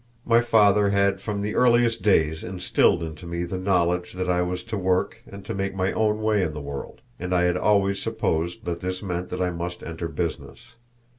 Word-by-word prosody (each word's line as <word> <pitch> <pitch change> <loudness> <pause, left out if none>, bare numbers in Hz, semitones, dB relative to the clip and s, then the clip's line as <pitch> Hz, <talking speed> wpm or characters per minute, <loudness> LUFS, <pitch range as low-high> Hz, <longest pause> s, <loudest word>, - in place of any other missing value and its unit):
My 115 0 +5
father 105 -3 +4
had 100 -1 +2
from 105 -2 -3
the 105 - -2
earliest 120 -2 +3
days 80 -6 +2
instilled 90 -2 +1
into 80 +1 -7
me 85 0 -3
the 90 +2 -4
knowledge 90 -2 +1
that 90 0 -3
I 90 0 +2
was 90 0 -2
to 115 -1 -5
work 95 -2 0
and 100 0 -11
to - - -4
make 95 0 -3
my 95 0 0
own 110 0 +1
way 110 -2 +2
in 80 -4 -1
the - - -4
world, 70 -1 -7 0.2
and 90 +1 -2
I 90 - +3
had 90 0 +2
always 100 +1 +2
supposed 85 +2 -2
that 85 -1 -3
this 90 +2 -4
meant 90 -1 -3
that 90 - -2
I 90 - 0
must 85 +1 -5
enter 85 0 -5
business. 80 +7 -5
90 Hz, 210 wpm, -24 LUFS, 85-100 Hz, 0.2 s, My